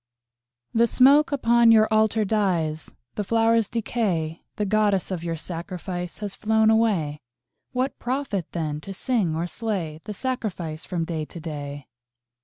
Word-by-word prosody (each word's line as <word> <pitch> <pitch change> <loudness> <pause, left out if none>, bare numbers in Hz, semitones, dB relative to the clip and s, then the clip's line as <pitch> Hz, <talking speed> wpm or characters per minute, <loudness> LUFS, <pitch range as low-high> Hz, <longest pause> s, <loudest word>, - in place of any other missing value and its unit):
_) - - +2
The 235 - +6
smoke 280 +6 +5
upon 235 -4 +4
your 220 -1 +6
Altar 220 0 +3
dies, 175 -7 -1 0.2
The 210 - -2
flowers 225 0 +2
decay, 190 -9 -1
The 210 - -1
Goddess 205 -2 +1
of 175 -3 -3
your 165 -1 -2
sacrifice 175 +1 -5
Has 205 -2 -5
flown 220 0 +3
away. 190 -10 +1 0.5
What 255 +2 -2
profit, 245 - -2
then, 155 -3 -3
to 195 +4 -8
sing 200 -9 0
or 165 +2 -1
slay 175 -6 -3
The 210 - -5
sacrifice 190 -11 -4
from 175 -3 -2
day 160 -2 -3
to 170 - -10
day? 145 -3 -6
200 Hz, 150 wpm, -24 LUFS, 165-225 Hz, 0.5 s, The